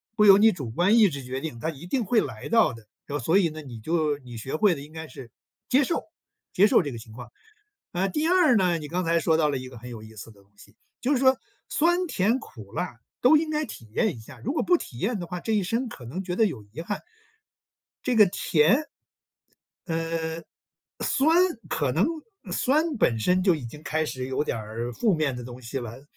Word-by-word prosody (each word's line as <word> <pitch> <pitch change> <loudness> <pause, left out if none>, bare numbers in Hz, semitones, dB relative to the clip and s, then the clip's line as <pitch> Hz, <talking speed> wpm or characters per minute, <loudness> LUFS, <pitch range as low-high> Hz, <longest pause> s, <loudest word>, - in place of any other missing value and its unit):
不 215 - +4
由 195 -1 +9
你 220 +2 +6
主 135 -10 -6
观 185 - +3
意 215 -4 +6
志 140 -4 -7
决 130 +1 -4
定， 155 -7 -5
它 160 - -2
一 155 +1 -8
定 235 +5 -1
会 220 +3 +3
来 110 -5 -6
到 225 -9 +4
的， 115 -3 -13 0.2
这 145 0 -3
所 160 +10 +3
以 180 -4 +3
呢， 155 0 -8
你 130 -6 -9
就 155 +1 0
你 125 -3 -10
学 130 +6 -4
会 195 +3 +4
了 - - -8
应 145 +2 -11
该 160 0 -7
是 125 -2 -11 0.4
接 265 +3 +4
受 335 - -2 0.5
接 200 +3 +5
受 - - +5
这 145 -6 -4
个 - - -6
情 110 0 -12
况。 120 +1 -10 0.6
啊， 185 +2 0
第 305 - 0
二 360 -8 +5
呢， 180 -4 +3
你 150 -2 -7
刚 180 +4 -2
才 170 0 +2
说 160 -1 +2
到 155 -2 +3
了 140 - -1
一 130 0 -7
个 125 -1 -11
很 120 +2 -10
有 115 -3 -8
意 110 0 -13
思 110 +2 -10
的 100 -2 -20
东 100 - -28
西， 105 +2 -18 0.2
就 255 - 0
是 265 - +2
说 260 0 +5 0.3
酸 345 +3 +2
甜 230 - +1
苦 110 - -12
辣 120 -4 -4 0.2
都 255 +6 +6
应 310 +1 +2
该 305 0 0
体 115 - -11
验 210 - +1
一 115 - -11
下， 110 - -13
如 265 - -3
果 315 - 0
不 355 - +4
体 120 - -9
验 215 - -1
的 175 - -5
话， 180 0 -5
这 225 - -3
一 210 -2 +2
生 230 +7 -1
可 125 - -10
能 175 +11 -5
觉 180 -1 -4
得 225 - +5
有 130 - -3
遗 105 +9 -12
憾。 205 +5 -4 1.0
这 255 - +1
个 215 -2 +8
甜 170 +3 +3 1.1
嗯 165 -1 -3 0.6
酸 305 +4 +3 0.3
可 140 -5 0
能 165 +8 +3 0.5
酸 305 +3 +1
本 115 - +2
身 180 +12 +2
就 185 -2 +4
已 150 -5 -6
经 150 +6 -9
开 160 0 -1
始 130 -4 -4
有 130 +2 -1
点 150 - -2
儿 110 +3 -5
负 210 - +2
面 150 -5 0
的 125 - -7
东 125 +1 -9
西 120 +4 -4
了， 120 +1 -8
160 Hz, 255 characters per minute, -26 LUFS, -, 1.1 s, 由